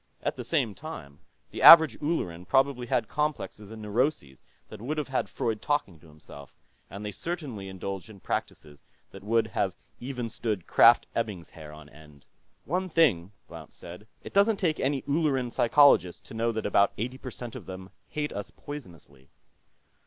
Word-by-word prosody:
At - - -1
the - - -6
same 135 -10 0
time, 85 - -10 0.3
the - - -6
average 160 -8 +10
Ulleran 90 - -3
probably 135 +2 +1
had 115 -2 0
complexes 150 -8 -3
and 110 -1 -9
neuroses 105 - -1 0.3
that - - -10
would 145 +6 -3
have 150 -3 -3
had 135 - -1
Freud 110 -2 -3
talking 145 - -1
to 80 - -18
himself, 75 -2 -14 0.3
and 100 +2 -8
they 105 - -4
certainly 135 - -6
indulged 95 +2 -6
in 105 -3 -13
practices 75 -4 -5 0.3
that 95 - -12
would 115 +2 +2
have - - -1 0.2
even 125 -2 -5
stood 105 -5 -4
Krafft 115 0 +6
Ebing's 105 -7 -3
hair 75 -2 -11
on 75 -1 -13
end. 75 -1 -17 0.4
"One 185 +4 -2
thing," 115 - +2 0.2
Blount 80 -3 -12
said. 90 +5 -11 0.2
"It - - -10
doesn't 200 +2 +4
take 165 -5 0
any 135 0 -1
Ulleran 140 -5 0
psychologist 120 -9 +4
to - - -12
know 115 +1 0
that 110 -1 -4
about 100 -1 +3
eighty 125 +4 -4
percent 125 -3 -8
of - - -9
them 95 0 -9 0.2
hate 150 -1 -3
us 100 0 -6
poisonously." 85 - -11
110 Hz, 170 wpm, -27 LUFS, 90-140 Hz, 0.4 s, average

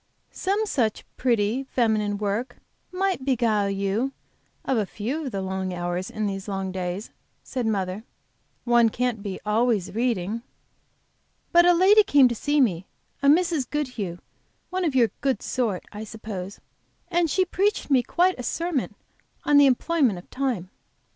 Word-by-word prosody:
"Some 405 +3 -1
such 235 - -1
pretty, 235 +1 +1
feminine 215 -4 +1
work 210 +5 -2 0.3
might 375 -5 -1
beguile 230 -6 +1
you 200 +7 -1 0.5
of 265 - +1
a 210 - 0
few 255 +12 -4
of - - -4
the 195 -2 -3
long 190 -1 -3
hours 175 +1 -3
of - - -15
these 195 -1 -4
long 195 -1 -3
days," 185 +2 -4 0.3
said 250 -3 -3
mother. 195 -1 -2 0.6
"One 240 -1 +4
can't 245 -1 -1
be 200 -2 -5
always 215 -3 +1
reading." 225 -2 -1 1.1
"But 345 0 +6
a 355 - +7
lady 390 +5 +7
came 285 -9 +5
to - - -1
see 290 +6 0
me, 190 -9 +1 0.3
a 280 - +2
Mrs. 320 -2 +3
Goodhue, 250 - -3 0.5
one 370 0 -1
of 295 -5 0
your 235 -5 +4
good 270 -2 0
sort, 225 -8 -1
I 210 +1 -7
suppose, 205 -3 -7 0.5
and 345 -2 +2
she 375 +5 +2
preached 390 -2 0
me 260 -2 +5
quite 355 +6 +1
a - - -4
sermon 330 +2 -2 0.5
on 290 - +4
the 285 -1 +8
employment 265 - +2
of 175 - -11
time. 245 -9 -2
235 Hz, 155 wpm, -25 LUFS, 200-285 Hz, 1.1 s, the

